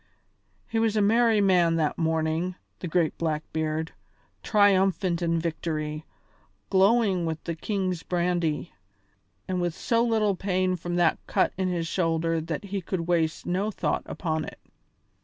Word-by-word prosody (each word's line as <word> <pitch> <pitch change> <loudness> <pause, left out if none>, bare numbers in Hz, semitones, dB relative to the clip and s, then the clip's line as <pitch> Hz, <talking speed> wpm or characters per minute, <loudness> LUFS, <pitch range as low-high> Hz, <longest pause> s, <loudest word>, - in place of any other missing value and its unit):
He 225 - -1
was 220 -1 +1
a - - +4
merry 225 0 +4
man 180 -4 +4
that 155 -2 +1
morning, 160 +2 0 0.2
the 180 - -4
great 165 -1 +1
Blackbeard, 160 0 -2 0.5
triumphant 195 -4 +3
in 165 -1 +1
victory, 155 -2 -3 0.7
glowing 195 -3 +3
with 160 -1 -4
the 170 - -3
king's 185 0 -2
brandy, 175 -3 -1 0.7
and 185 -1 -1
with 175 -2 -1
so 230 +3 +1
little 220 -4 +2
pain 185 -1 0
from 175 0 -4
that 175 -1 +3
cut - - +1
in 190 0 -1
his 175 -2 -1
shoulder 165 -1 0
that 165 +4 -4
he 200 -1 -4
could 180 0 -3
waste 165 -2 0
no 190 +4 0
thought 215 - -1
upon 160 -3 -2
it. - - -8
175 Hz, 145 wpm, -26 LUFS, 165-195 Hz, 0.7 s, a